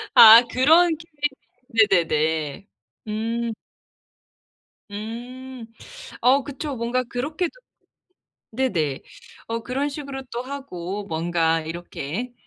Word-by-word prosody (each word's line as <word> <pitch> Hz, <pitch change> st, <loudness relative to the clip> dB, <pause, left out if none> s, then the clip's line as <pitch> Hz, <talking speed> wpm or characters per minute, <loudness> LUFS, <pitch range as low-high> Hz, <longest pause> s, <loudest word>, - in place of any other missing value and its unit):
아. 225 Hz, +1 st, +11 dB
그런 320 Hz, +7 st, +5 dB
Q&A. 275 Hz, -7 st, -1 dB, 0.2 s
네네네. 155 Hz, +3 st, -1 dB, 0.4 s
음. 230 Hz, +2 st, -2 dB, 1.4 s
음. 240 Hz, +4 st, -7 dB, 0.5 s
어 260 Hz, +4 st, +4 dB
그쵸. 285 Hz, +1 st, -5 dB
뭔가 240 Hz, +2 st, 0 dB
그렇게도 300 Hz, +8 st, -3 dB, 1.0 s
네네. 180 Hz, -, -1 dB, 0.5 s
어 230 Hz, 0 st, -2 dB
그런 270 Hz, +5 st, -2 dB
식으로 280 Hz, -2 st, -6 dB
또 240 Hz, +1 st, -3 dB
하고 210 Hz, -8 st, -6 dB
뭔가 165 Hz, -1 st, 0 dB
이렇게 170 Hz, -, -5 dB
235 Hz, 170 characters per minute, -23 LUFS, 190-270 Hz, 1.4 s, 아